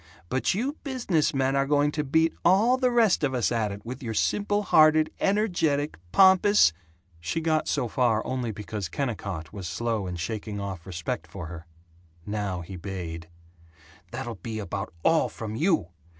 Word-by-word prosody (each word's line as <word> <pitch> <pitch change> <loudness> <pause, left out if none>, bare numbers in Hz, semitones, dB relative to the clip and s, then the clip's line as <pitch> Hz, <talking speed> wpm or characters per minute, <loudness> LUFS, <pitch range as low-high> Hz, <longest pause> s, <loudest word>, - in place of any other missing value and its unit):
But 130 +7 +1
you 265 +8 -2
business 235 - 0
men 135 -1 +1
are 135 0 +2
going 145 0 +3
to 150 0 -2
beat 160 +3 +2
all 210 +8 +5
the 255 -1 +2
rest 230 -9 +3
of 135 -2 +1
us 120 - +1
at 110 -3 0
it, 100 +2 -9
with 125 +4 -6
your 115 -3 -4
simple 205 - +1
hearted, 155 -3 +5
energetic, 175 -8 +1 0.2
pompous 190 - +6 0.2
" 90 +2 -40
She 85 - -2
got 160 -1 0
so 125 - 0
far 115 -1 +1
only 125 -3 -2
because 105 -3 -5
Kennicott 95 - -4
was 95 -4 -6
slow 110 +3 -2
in 90 - -4
shaking 100 +4 -4
off 95 -4 -6
respect 85 -2 -4
for 90 +1 -7
her. 85 +1 -9 0.6
Now 100 -3 -3
he 90 +2 -8
bayed: 85 -3 -6 0.8
"That'll 120 -6 -6
be 110 -2 -5
about 100 0 -4
all 165 -1 +3
from 110 -2 -6
you! 160 - +1
120 Hz, 170 wpm, -26 LUFS, 100-160 Hz, 0.8 s, pompous